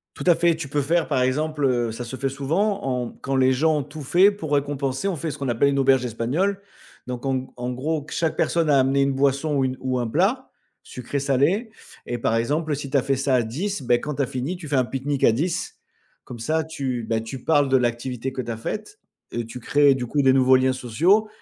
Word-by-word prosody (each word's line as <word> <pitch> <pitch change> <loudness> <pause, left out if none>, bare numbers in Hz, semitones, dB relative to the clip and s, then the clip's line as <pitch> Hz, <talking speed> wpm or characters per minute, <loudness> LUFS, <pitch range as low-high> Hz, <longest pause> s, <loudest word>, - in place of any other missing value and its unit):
Tout - - -7
à 175 - +6
fait, 170 0 +3
tu 160 -3 -6
peux 145 +2 0
faire 165 +4 +1
par 130 -4 +1
exemple 150 +3 0
heu, 120 -3 +1
ça 120 +2 -6
se 120 - -8
fait 135 +1 -1
souvent 160 +10 -1
en 125 -2 -2
quand 135 -1 -3
les 130 0 +4
gens 155 +4 +2
ont - - -1
tout 150 +2 -9
fait 180 +8 +5
pour 180 -8 -6
récompenser, 140 +2 -1
on 190 - -2
fait 160 0 -3
ce 145 - -8
qu'on 140 - -3
appelle 120 +4 +2
une 140 - 0
auberge 135 -1 +3
espagnole. 140 - -1 0.5
Donc 125 +1 -5
en 135 - +1
g 130 - -7
en 125 0 -3
gros, 145 +4 -2
chaque 160 -2 -1
personne 165 -3 +1
a 140 - +5
amené 135 +1 +3
une 135 0 +2
boisson 140 +2 +1
ou 135 - +2
une 130 0 -2
ou 130 -1 -1
un 120 - -1
plat, 195 - 0 0.3
sucré, 125 +3 -5
salé 140 - +1 0.4
et 120 - -3
par 115 -1 0
exemple 150 +6 0
si 140 -1 -6
tu 140 - +1
as 135 - +3
fait 135 +1 0
ça 135 0 +1
à 125 - +3
10, 160 - -3
bah, 120 -1 +3
quand 150 +4 -5
tu 145 - +1
as - - 0
fini 130 +9 -3
tu 170 -4 -9
fais 140 - +1
un 130 - +3
pique-nique 135 +2 -2
à - - +6
10. 165 +9 -2 0.5
Comme 120 - -9
ça 155 +8 0
tu 135 -6 -3
bah, 115 -1 +1
tu 115 +3 -7
parles 145 -3 +3
de 135 - +4
l'activité 125 +1 -2
que 130 - -4
tu 120 - -5
as - - -5
faite, 215 - -6 0.3
heu, 120 - -2
tu 115 +2 -8
crées 145 +3 +4
du 125 -2 -3
coup 145 +4 0
des 135 -1 +5
nouveaux 130 0 +5
liens 130 0 +2
sociaux 165 - +2
135 Hz, 250 wpm, -23 LUFS, 125-155 Hz, 0.5 s, à